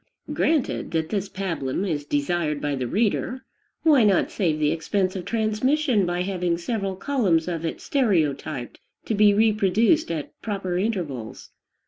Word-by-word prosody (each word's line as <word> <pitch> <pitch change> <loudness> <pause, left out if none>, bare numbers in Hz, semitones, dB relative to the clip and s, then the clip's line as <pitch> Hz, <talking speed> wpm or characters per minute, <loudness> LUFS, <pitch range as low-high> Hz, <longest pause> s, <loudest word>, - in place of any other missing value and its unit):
Granted 315 -5 0
that 160 -1 0
this 200 -2 -2
pabulum 180 -4 -2
is 145 -4 -2
desired 150 +1 0
by 145 0 -2
the 130 -3 -2
reader, 230 - -1 0.4
why 295 -7 +5
not 200 -4 +3
save 165 -6 0
the 150 -1 +2
expense 185 +3 -1
of 180 -2 -5
transmission 230 - +1
by 175 +1 -1
having 180 -3 -1
several 195 +1 -2
columns 190 - +1
of 170 -2 -3
it 165 - -3
stereotyped, 155 - -1 0.3
to - - -1
be 210 0 +5
reproduced 215 - +3
at 155 -4 -4
proper 195 -4 -3
intervals? 165 - -4
185 Hz, 145 wpm, -24 LUFS, 160-215 Hz, 0.4 s, why